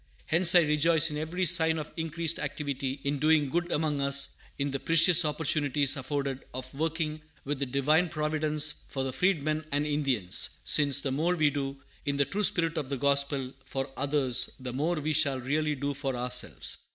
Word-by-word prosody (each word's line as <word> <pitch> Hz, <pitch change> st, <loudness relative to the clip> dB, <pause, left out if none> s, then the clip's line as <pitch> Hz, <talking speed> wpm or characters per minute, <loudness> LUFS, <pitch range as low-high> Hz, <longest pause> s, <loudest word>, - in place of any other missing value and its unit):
Hence 175 Hz, +2 st, +4 dB
I 175 Hz, -, +8 dB
rejoice 155 Hz, +1 st, +2 dB
in 150 Hz, -, -4 dB
every 170 Hz, +4 st, -2 dB
sign 160 Hz, -1 st, +5 dB
of 155 Hz, -1 st, -6 dB
increased 165 Hz, 0 st, -2 dB
activity 140 Hz, -2 st, -4 dB
in 140 Hz, 0 st, -2 dB
doing 155 Hz, -1 st, +2 dB
good 175 Hz, +4 st, -2 dB
among 150 Hz, -2 st, -1 dB
us, 140 Hz, 0 st, +4 dB, 0.2 s
in 140 Hz, 0 st, -2 dB
the 135 Hz, -, -3 dB
precious 165 Hz, +3 st, +5 dB
opportunities 145 Hz, -2 st, +1 dB
afforded 135 Hz, -1 st, -4 dB
of 130 Hz, 0 st, -7 dB
working 155 Hz, +1 st, -3 dB, 0.2 s
with 145 Hz, 0 st, -3 dB
the 140 Hz, -, -2 dB
Divine 150 Hz, +7 st, +1 dB
Providence 150 Hz, -1 st, -1 dB
for 135 Hz, -, -4 dB
the 130 Hz, -1 st, -4 dB
Freedmen 155 Hz, -4 st, 0 dB
and 145 Hz, +1 st, 0 dB
Indians; 135 Hz, -11 st, 0 dB, 0.2 s
since 140 Hz, -2 st, +3 dB
the 135 Hz, -, -3 dB
more 165 Hz, +6 st, 0 dB
we 150 Hz, -3 st, +2 dB
do, 140 Hz, -1 st, -4 dB, 0.3 s
in 140 Hz, -2 st, -2 dB
the 140 Hz, -, +2 dB
true 205 Hz, +7 st, -3 dB
spirit 165 Hz, -4 st, +2 dB
of 140 Hz, -3 st, -6 dB
the 140 Hz, -, -3 dB
gospel, 140 Hz, -1 st, 0 dB
for 135 Hz, 0 st, -5 dB
others, 135 Hz, -3 st, 0 dB
the 125 Hz, -1 st, -6 dB
more 155 Hz, +7 st, -1 dB
we 155 Hz, 0 st, -2 dB
shall 145 Hz, -4 st, +2 dB
really 150 Hz, +4 st, -1 dB
do 140 Hz, +1 st, -3 dB
for 135 Hz, -2 st, -3 dB
ourselves. 125 Hz, 0 st, 0 dB
145 Hz, 185 wpm, -28 LUFS, 140-160 Hz, 0.3 s, I